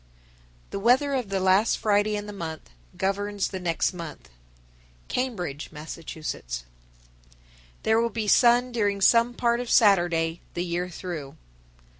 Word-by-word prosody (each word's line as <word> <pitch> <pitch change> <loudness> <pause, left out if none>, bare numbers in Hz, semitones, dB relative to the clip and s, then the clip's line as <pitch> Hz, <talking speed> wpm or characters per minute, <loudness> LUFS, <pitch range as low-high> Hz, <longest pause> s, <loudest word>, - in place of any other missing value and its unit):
The - - -3
weather 255 +6 +3
of 250 -6 -1
the 195 -1 0
last 190 +4 +3
Friday 210 0 +2
in 205 0 -4
the 210 - -7
month 160 - -7 0.3
governs 200 +1 -1
the 190 - -5
next 175 +1 0
month. 160 - -9 0.8
Cambridge, 180 - -3
Mass. 155 0 -7
941. 60 - -6 1.2
There 220 +1 +3
will 235 - +1
be 220 -1 -3
sun 245 +3 +5
during 205 -4 0
some 235 +4 +4
part 235 0 +1
of 245 -1 -4
Saturday 175 -5 +3
the 175 +1 -1
year 175 +1 -2
through. 165 -5 -7
195 Hz, 140 wpm, -26 LUFS, 170-230 Hz, 1.2 s, sun